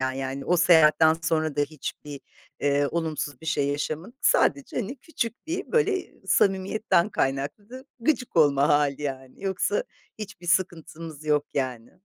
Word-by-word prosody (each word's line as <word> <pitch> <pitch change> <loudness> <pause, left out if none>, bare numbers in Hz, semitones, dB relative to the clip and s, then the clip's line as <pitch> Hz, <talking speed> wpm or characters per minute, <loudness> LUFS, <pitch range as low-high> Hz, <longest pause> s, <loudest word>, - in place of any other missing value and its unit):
yani, 135 +1 -4
o 180 - +2
seyahatten 160 -2 +6
sonra 155 -2 0
da 145 - +2
hiçbir, 145 -1 -6 0.4
eee, 145 0 +2
olumsuz 155 -5 -3
bir 160 - -11
şey 145 -3 +1
yaşamadık, 155 - -4
sadece, 140 -1 +2
hani, 250 +8 -4
küçük 245 -5 -5
bir, 360 +5 -4
böyle, 415 -5 +1
samimiyetten 195 0 +2
kaynaklı 190 - -3
gıcık 250 0 -1
olma 145 -2 +4
hâli, 145 -1 +2
yani. 135 +3 -6
Yoksa 195 +1 0 0.3
hiçbir 195 -5 -9
sıkıntımız 165 -4 -2
yok, 150 -1 +2
yani. 125 -4 -3
160 Hz, 135 wpm, -26 LUFS, 145-195 Hz, 0.4 s, seyahatten